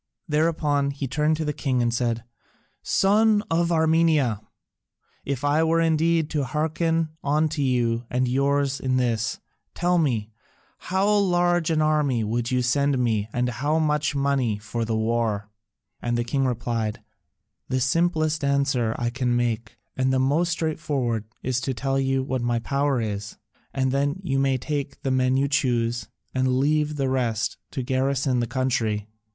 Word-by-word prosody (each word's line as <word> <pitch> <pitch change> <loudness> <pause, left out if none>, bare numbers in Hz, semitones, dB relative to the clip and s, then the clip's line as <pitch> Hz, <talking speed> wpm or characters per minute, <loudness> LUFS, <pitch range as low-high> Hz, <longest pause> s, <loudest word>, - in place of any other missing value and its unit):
Thereupon 150 -2 +1
he 140 0 -4
turned 150 +4 +1
to 160 - -2
the 150 - -1
king 135 -3 -1
and 120 -1 +1
said, 115 -1 -1 0.6
"Son 210 +2 +3
of 170 +1 +2
Armenia, 160 -8 +2 0.8
if 140 -2 -3
I 145 +2 +3
were 165 +1 +2
indeed 165 0 +2
to 150 -3 0
hearken 160 +3 0
unto 150 +1 +1
you 120 -3 +1
and 125 0 0
yours 140 +2 +1
in 130 -1 0
this, 115 -3 0 0.4
tell 175 0 +2
me, 115 -9 0 0.5
how 190 +2 0
large 175 -5 +2
an 155 -1 +2
army 150 -6 +1
would 115 +2 -1
you 125 -1 +1
send 140 +2 +2
me 110 -4 0
and 125 +2 0
how 145 +6 0
much 150 -2 +1
money 140 -6 +1
for 110 +2 -4
the 110 0 -1
war?" 110 -2 -1 0.5
And 120 0 -1
the 120 - 0
king 135 +3 0
replied, 115 -3 -2 0.6
"The 130 0 0
simplest 155 +2 +1
answer 140 -5 +1
I 120 0 -1
can 125 -1 0
make 120 -1 -2 0.2
and 130 0 +1
the 130 - +2
most 145 +7 +2
straightforward 150 -9 -1 0.2
is 130 0 -1
to 130 0 -2
tell 135 +3 -1
you 135 0 +1
what 130 -1 -2
my 120 0 0
power 140 +3 0
is, 105 -2 -4 0.3
and 130 -1 0
then 145 +5 0
you 135 -6 0
may 135 -1 +2
take 140 +1 -4
the 135 - 0
men 130 0 +2
you 140 +1 +2
choose, 120 -4 0 0.3
and 130 0 +1
leave 150 +2 +1
the 135 -2 0
rest 120 -4 -1
to 130 - -4
garrison 130 0 0
the 120 - 0
country. 115 -4 -1
135 Hz, 160 wpm, -24 LUFS, 120-155 Hz, 0.8 s, Son